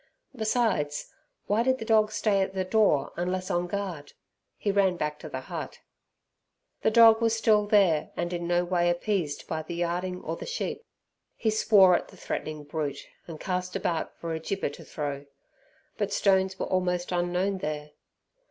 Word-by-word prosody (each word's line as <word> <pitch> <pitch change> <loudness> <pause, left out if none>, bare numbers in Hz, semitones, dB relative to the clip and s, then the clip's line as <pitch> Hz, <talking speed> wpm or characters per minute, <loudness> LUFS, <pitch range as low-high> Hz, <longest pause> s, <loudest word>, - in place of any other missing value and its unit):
Besides, 220 - 0 0.3
why 210 +3 +2
did 260 +2 +2
the 225 - -6
dog 215 -1 +3
stay 205 -2 +1
at 190 0 -2
the 190 - 0
door 185 -9 +2
unless 185 +1 -2
on 175 0 0
guard? 180 -7 -5 0.4
He 205 - 0
ran 195 -3 +2
back 150 -2 -3
to 155 - -8
the 130 -2 -5
hut. - - -7 1.0
The - - +3
dog 225 0 +7
was 225 -1 +3
still 210 -2 +3
there, 195 -7 +3
and 175 +1 -2
in 170 -1 -3
no 175 0 +2
way 175 -1 +2
appeased 175 -4 -1
by 160 -1 -2
the 170 - -7
yarding 175 +2 -2
or 165 - -3
the - - -8
sheep. - - -3 0.5
He 220 - 0
swore 200 -4 +6
at - - -2
the - - -16
threatening 155 -1 -4
brute, 145 -1 -4 0.2
and 160 -3 -8
cast 180 0 -3
about 175 -4 -2
for 165 -1 -4
a 160 - -2
gibber 195 +4 -2
to - - -11
throw, 145 -2 -5 0.7
but 205 -1 -1
stones 190 -1 +2
were - - -2
almost 180 -1 -1
unknown 180 +2 0
there. 150 -2 -4
180 Hz, 175 wpm, -27 LUFS, 165-205 Hz, 1.0 s, dog